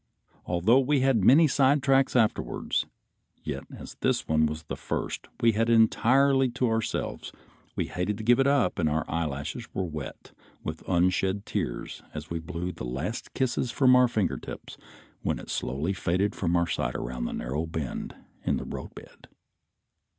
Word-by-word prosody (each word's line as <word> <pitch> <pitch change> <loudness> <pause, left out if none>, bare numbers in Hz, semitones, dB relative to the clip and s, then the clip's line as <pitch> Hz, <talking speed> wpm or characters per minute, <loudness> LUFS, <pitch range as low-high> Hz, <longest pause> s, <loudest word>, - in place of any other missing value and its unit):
Although 90 +9 +4
we 135 +1 +2
had 130 -6 +3
many 145 - +7
sidetracks 135 -1 +3
afterwards, 115 -3 +1 0.6
yet - - -4
as - - -10
this - - 0
one 80 0 +3
was 75 +1 -5
the 75 - -5
first - - -4
we 115 - +5
had 115 +2 +1
entirely 130 +4 +4
to 125 +1 0
ourselves 115 -1 -2 0.4
we - - 0
hated 95 +3 -2
to 110 - -6
give 120 +3 +4
it 135 - +4
up 140 -9 +2
and 80 -3 +2
our 80 +2 0
eyelashes 80 - -3
were 95 - 0
wet 75 -4 -7 0.3
with 80 +1 -5
unshed 95 +2 +1
tears - - -4
as 75 +1 -7
we 85 - -2
blew 85 +2 -4
the 85 - -8
last 65 - -4
kisses 130 -1 0
from 125 +1 +5
our 125 0 +6
finger 110 -4 0
tips - - -9 0.5
when - - -1
it - - -8
slowly 75 +9 -1
faded 95 +2 0
from 85 -2 0
our 85 0 +3
sight 75 - -2
around - - -3
a - - -5
narrow 75 +7 -3
bend 80 -5 -4 0.3
in - - +1
the - - -5
roadbed. - - -9
95 Hz, 165 wpm, -27 LUFS, 80-125 Hz, 0.6 s, many